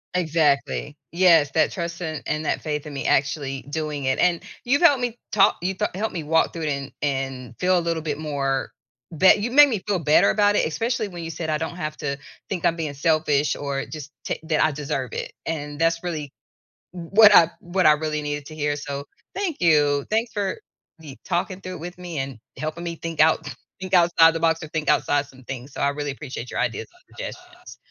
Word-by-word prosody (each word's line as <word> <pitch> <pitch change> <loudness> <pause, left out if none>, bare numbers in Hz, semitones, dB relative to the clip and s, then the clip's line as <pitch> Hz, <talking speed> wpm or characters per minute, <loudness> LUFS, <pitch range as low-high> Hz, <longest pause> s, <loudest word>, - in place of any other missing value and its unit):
Exactly. 155 -3 +1 0.2
Yes. 165 -5 +5
That 160 - +2
trust 170 0 -5
and 155 -2 -4
and 155 0 -2
that - - -1
faith 150 -1 -3
in 150 - -8
me 140 - -4
actually 135 -1 0
doing 150 -2 -3
it. 130 0 0
And 175 -2 +2 0.2
you've 275 +7 +2
helped 285 -7 +5
me 240 -1 -2
ta 205 0 +4
you 185 +2 -1
th - - -1
helped 215 +3 -2
me 165 -3 -4
walk 160 +2 +2
through 165 - -5
it 155 - -1
and 140 -1 -3
and 135 -4 -3
feel 185 0 +3
a - - -2
little 165 -1 -2
bit 150 -2 -3
more 140 -3 -2 0.5
be 190 - +7
you've 235 +4 -3
made 290 0 +8
me 215 -7 -2
feel 200 -3 +1
better 160 +5 +4
about 205 -1 +3
it, - - +2
especially 225 +6 -1
when 175 -3 -8
you 165 - -5
said 160 0 -5
I 155 - +1
don't 160 +2 -4
have 155 -3 -4
to 140 -1 -3 0.3
think 180 -4 -3
I'm 165 - +3
being 160 -4 -4
selfish 150 0 +1
or 140 -1 -3
just 150 -2 -8
t - - -2
that 160 -1 +1
I 155 - +3
deserve 135 -4 -4
it. - - -4 0.2
And 150 -2 -4
that's 165 +1 +2
really 155 -5 -4 0.6
w 170 -2 -8
what 210 -1 +8
I 170 -1 +7
what 180 +2 0
I 155 - +8
really 150 0 -2
needed 145 -1 -4
to 155 - -9
hear. 150 -1 -1
So, 140 -1 -5 0.3
thank 380 -6 -2
you. 145 -4 +3
Thanks 225 +2 0
for 205 - -2 0.4
me 145 -4 -11
talking 185 +2 -2
through 185 -1 -7
it 180 - -9
with 175 +2 -8
me 175 -3 -6
and 135 -3 -4 0.2
helping 155 +3 -4
me 170 -1 -4
think 165 -1 -5
out 155 -3 +3 0.3
think 190 0 -3
outside 170 -2 +6
the 165 - -3
box 165 0 +2
or 160 - -6
think 155 0 -3
outside 145 -1 +2
some 130 -2 -17
things. 130 +1 -7
So, - - -7
I 140 - +3
really 145 0 -3
appreciate 130 -4 -7
your - - -2
ideas 115 - -2
and 365 +1 -23
suggestions. 360 0 -9
160 Hz, 225 wpm, -23 LUFS, 145-180 Hz, 0.6 s, made